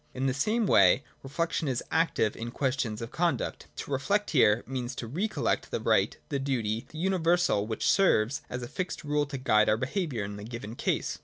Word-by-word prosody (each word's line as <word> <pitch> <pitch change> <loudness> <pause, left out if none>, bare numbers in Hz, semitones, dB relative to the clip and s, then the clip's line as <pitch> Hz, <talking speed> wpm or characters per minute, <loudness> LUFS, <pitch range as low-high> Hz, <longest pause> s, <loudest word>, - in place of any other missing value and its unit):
In 130 - -1
the 130 - +2
same 215 - +1
way 100 - +5 0.2
reflection 160 +3 -2
is 130 -3 -1
active 160 -10 +1
in 115 +1 -5
questions 125 -4 -2
of 115 - -7
conduct. 170 0 -1
To - - -7
reflect 200 +10 0
here 120 -6 +4
means 130 -1 -4
to 120 - -5
recollect 180 - -1
the - - -2
right, - - +2
the 140 -3 -1
duty,— 120 -4 -2
the 155 - -11
universal 175 - +2
which 110 - -2
serves 140 - +3
as 125 0 -4
a - - -5
fixed 180 +7 -4
rule 150 -1 0
to 140 -1 -5
guide 110 -5 +3
our 105 - +3
behaviour 135 - -2
in 100 0 -6
the 105 - -8
given 115 -1 -7
case. - - -2
135 Hz, 200 wpm, -28 LUFS, 115-165 Hz, 0.2 s, way